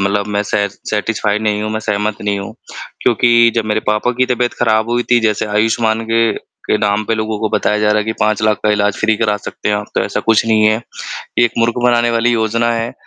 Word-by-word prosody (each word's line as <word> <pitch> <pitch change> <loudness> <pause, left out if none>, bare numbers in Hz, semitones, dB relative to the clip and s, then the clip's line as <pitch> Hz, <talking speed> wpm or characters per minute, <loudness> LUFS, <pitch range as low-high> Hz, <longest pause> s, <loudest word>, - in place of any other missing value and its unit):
मतलब 100 +1 0
मैं 105 0 -1
सै 100 0 -1
सैटिस्फाइड 105 +1 -2
नहीं 105 -1 0
हूँ, 110 - -3
मैं 110 - -2
सहमत 105 0 -1
नहीं 100 -1 -1
हूँ। 100 - -7 0.5
क्योंकि 120 -1 +4
जब 115 -2 0
मेरे 110 0 0
पापा 105 +3 +1
की 130 - +4
तबीयत 125 -1 0
खराब 110 +1 +2
हुई 120 0 +1
थी, 120 -1 +5
जैसे 110 0 0
आयुष्मान 110 +1 +1
के 115 -1 +3 0.3
के - - +2
नाम 105 0 0
पे 115 - 0
लोगों 110 -1 -3
को 110 - 0
बताया 105 0 +1
जा 105 0 +1
रहा 105 0 +3
है 105 - -1
कि 110 - -2
5 110 0 +1
लाख 110 -1 +2
का 105 - +3
इलाज 105 -1 +1
फ़्री 110 -1 +1
करा 105 -2 0
सकते 105 - -6
हैं 105 - +2
आप, 105 0 -5
तो - - +1
ऐसा - - -2
कुछ 115 -1 +2
नहीं 110 -1 +3
है, 110 +2 +2 0.6
एक 120 -1 +4
मूर्ख 115 0 +2
बनाने 120 -1 +3
वाली 115 +1 +1
योजना 115 +1 +1
है। 115 +1 -3
110 Hz, 240 wpm, -16 LUFS, 105-115 Hz, 0.6 s, थी